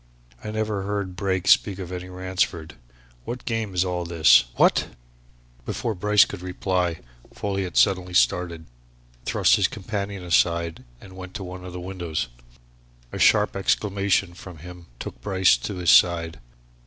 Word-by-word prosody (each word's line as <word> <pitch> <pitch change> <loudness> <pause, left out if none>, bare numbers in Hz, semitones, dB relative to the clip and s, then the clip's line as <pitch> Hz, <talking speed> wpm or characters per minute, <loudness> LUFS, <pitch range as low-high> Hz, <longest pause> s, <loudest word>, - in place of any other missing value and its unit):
I - - -5
never 110 -2 -2
heard 100 -2 -3
Brake 95 -1 -2
speak 100 -3 +4
of 90 -2 -7
any 90 0 -6
Ransford! 90 -4 -2 0.5
What 125 - -6
game 110 -5 -3
is 90 +1 +2
all 90 -1 -2
this? 80 -9 +5
What - - +3 0.4
" - - -31
Before 115 - -2
Bryce 105 +2 +4
could 100 - -8
reply, 90 -2 -2 0.3
Folliot 95 -3 -3
suddenly 90 -3 +2
started, 85 -3 +1 0.6
thrust - - +3
his - - +3
companion 100 -2 -5
aside 85 -3 +1 0.2
and 95 +5 -14
went 95 0 -10
to 100 - -5
one 90 0 -8
of 90 - -8
the 90 - -6
windows. 90 -7 -4 0.8
A - - -6
sharp - - +4
exclamation 100 -1 0
from 90 -1 -11
him 90 +2 -12
took - - -8
Bryce 95 -2 +3
to 95 +11 -5
his 90 -2 +2
side. 85 -2 +4
90 Hz, 155 wpm, -24 LUFS, 85-100 Hz, 0.8 s, this